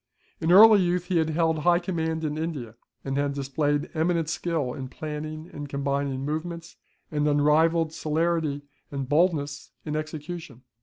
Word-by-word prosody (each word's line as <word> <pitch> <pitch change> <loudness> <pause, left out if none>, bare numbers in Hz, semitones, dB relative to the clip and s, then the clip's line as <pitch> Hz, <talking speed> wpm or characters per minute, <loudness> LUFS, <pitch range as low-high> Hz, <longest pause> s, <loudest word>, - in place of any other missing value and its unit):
In 160 - +1
early 210 +2 +9
youth 180 0 0
he 175 -1 +1
had 160 0 +1
held 160 0 +1
high 175 +2 +4
command 160 -3 -2
in 150 -1 -1
India; 155 -8 -4 0.3
and 135 0 -2
had 140 0 0
displayed 145 +1 -1
eminent 165 0 0
skill 155 -5 -1
in 130 - -6
planning 155 +3 -6
and 145 -1 -7
combining 140 -1 -2
movements, 165 +3 -4 0.4
and 150 -1 +1
unrivalled 155 +2 +3
celerity 160 -2 -1 0.3
and 135 -2 -4
boldness 145 -2 +1 0.2
in 150 -1 -3
execution. 155 -3 -6
155 Hz, 150 wpm, -26 LUFS, 145-165 Hz, 0.4 s, early